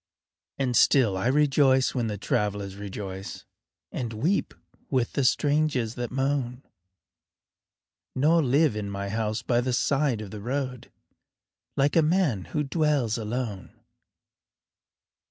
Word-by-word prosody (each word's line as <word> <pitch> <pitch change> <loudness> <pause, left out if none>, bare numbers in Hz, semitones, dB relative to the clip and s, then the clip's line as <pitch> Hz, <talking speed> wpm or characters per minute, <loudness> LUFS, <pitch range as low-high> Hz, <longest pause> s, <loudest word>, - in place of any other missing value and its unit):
And 130 -3 0
still 115 -5 +4
I 95 +5 -1
rejoice 135 -1 +3
when 120 -3 -1
the 105 -1 -3
travelers 100 -1 -2
rejoice 100 -1 -7 0.5
And 115 -2 -4
weep 160 - 0 0.3
with 130 -4 0
the 140 - 0
strangers 145 -3 +1
that 120 -2 -4
moan, 135 -1 -1 1.5
Nor 155 +6 +4
live 145 -1 +3
in 105 -1 -4
my 100 0 -4
house 110 0 -2
by 120 -1 +2
the 125 0 -1
side 135 -1 +1
of 105 - -8
the 105 -1 -7
road 130 +1 -4 0.9
Like 140 +1 +2
a 165 - +6
man 155 - +1
who 150 - -2
dwells 140 -6 0
alone. 110 -3 -5
125 Hz, 125 wpm, -26 LUFS, 105-140 Hz, 1.5 s, a